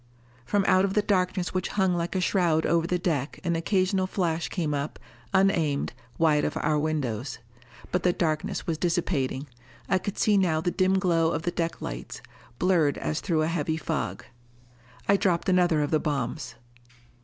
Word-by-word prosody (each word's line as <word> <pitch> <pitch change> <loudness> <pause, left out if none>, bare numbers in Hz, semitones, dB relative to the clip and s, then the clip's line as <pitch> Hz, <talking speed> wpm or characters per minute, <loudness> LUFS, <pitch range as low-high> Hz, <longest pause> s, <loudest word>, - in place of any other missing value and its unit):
From 195 +9 +1
out 185 0 +5
of 195 0 0
the 210 - +3
darkness 185 -2 0
which 185 - -1
hung 190 -2 +3
like 170 +1 -2
a 185 - +1
shroud 170 -4 +2
over 170 0 +2
the 180 - +1
deck 155 -6 -2
an 170 -2 0
occasional 185 +2 +1
flash 170 -4 -1
came 160 -6 -1
up, 145 +1 -3 0.3
unaimed, 165 -7 +2 0.2
wide 155 -3 +3
of - - -1
our 150 -1 +1
windows. 145 -6 -2 0.5
But 180 - +1
the 180 - +3
darkness 175 +4 -1
was 165 -3 -2
dissipating. 150 -6 0 0.4
I 190 - +2
could 195 +2 -5
see 210 -2 +3
now 165 -4 +2
the 175 +2 -1
dim 190 +1 +2
glow 170 -4 +2
of 160 - -2
the 175 - 0
deck 165 -1 -3
lights, - - -6 0.4
blurred 165 -5 +2
as 155 - -2
through 160 -5 +1
a - - +1
heavy 160 -1 -1
fog. 155 - -3 0.8
I 200 - +5
dropped 180 -2 +1
another 175 -4 +3
of 145 - -3
the 155 - +3
bombs. 140 -6 -3
170 Hz, 180 wpm, -27 LUFS, 155-185 Hz, 0.8 s, out